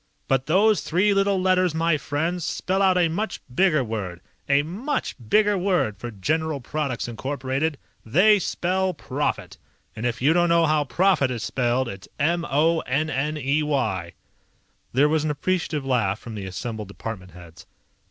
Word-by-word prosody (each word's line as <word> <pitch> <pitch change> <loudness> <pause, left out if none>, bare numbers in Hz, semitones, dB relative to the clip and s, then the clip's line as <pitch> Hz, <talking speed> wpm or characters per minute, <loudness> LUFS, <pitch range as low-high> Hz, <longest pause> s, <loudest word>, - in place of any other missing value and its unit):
"But 135 0 +1
those 205 +6 +4
three 190 +5 +2
little 195 -1 +2
letters, 185 -2 +2
my 165 0 +2
friends, 160 +5 -2
spell 190 +4 -1
out 190 -2 +4
a 175 -2 +4
much 185 +4 -3
bigger 155 -2 +3
word. 100 -7 -4 0.3
A 140 +1 +4
much 205 - -3
bigger 210 -1 +4
word 180 - +1
for 120 - -5
General 155 - -1
Products, 135 -2 -3
Incorporated. 135 +5 -2 0.3
They 195 - +4
spell 185 +1 -1
PROFIT! - - -3 0.4
And 115 +2 -2
if 115 -2 -3
you 145 +5 +4
don't 175 0 +3
know 170 0 +4
how 155 -1 +2
profit 170 +1 +2
is 120 -3 -4
spelled, 125 +1 0
it's 95 -4 -8
M 170 +3 +1
O 160 +4 +3
N 155 +4 -1
N 150 +3 -1
E 145 +2 +1
Y!" 110 - -1 0.8
There 140 +4 +4
was 155 0 +1
an 155 - -1
appreciative 150 -1 -1
laugh 115 -7 +1
from 115 +1 -10
the 100 -3 -5
assembled 105 +3 -5
department 100 -3 -7
heads. 85 -1 -14
150 Hz, 165 wpm, -24 LUFS, 120-175 Hz, 0.8 s, those